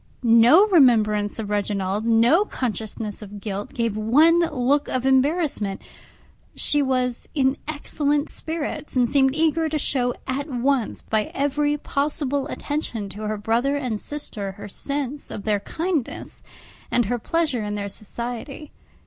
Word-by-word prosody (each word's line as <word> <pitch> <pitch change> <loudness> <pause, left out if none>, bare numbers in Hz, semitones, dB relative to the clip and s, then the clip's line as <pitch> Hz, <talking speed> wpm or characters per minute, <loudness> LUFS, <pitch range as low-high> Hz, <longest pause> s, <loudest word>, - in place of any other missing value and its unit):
No 235 - +7
remembrance 220 - +3
of 210 -2 -4
Reginald, 205 0 -1
no 235 - +4
consciousness 220 - -4
of 205 0 -9
guilt, 200 0 -5
gave 230 -4 0
one 295 +11 +4
look 280 +1 +1
of 255 0 -2
embarrassment; 265 - +1 0.8
she 295 - +3
was 255 -3 -1
in 265 -2 +2
excellent 295 -1 -1
spirits, 315 -2 -5
and 250 -2 +3
seemed 265 +1 +3
eager 320 0 +2
to 310 - -1
show 250 -4 0
at 280 +3 -3
once 255 -1 0
by 215 -1 0
every 290 +1 +1
possible 285 -1 -1
attention 285 -10 -4
to 200 +3 -9
her 215 0 -2
brother 235 +7 +1
and 245 -6 -2
sister 210 -10 -5
her 205 - -9
sense 280 +5 -3
of 200 - -6
their 210 -2 +1
kindness, 320 - -3 0.5
and 240 - +2
her 245 +4 -1
pleasure 300 -2 0
in 210 0 -3
their 200 -1 -3
society. 240 +8 -7
255 Hz, 140 wpm, -23 LUFS, 215-290 Hz, 0.8 s, No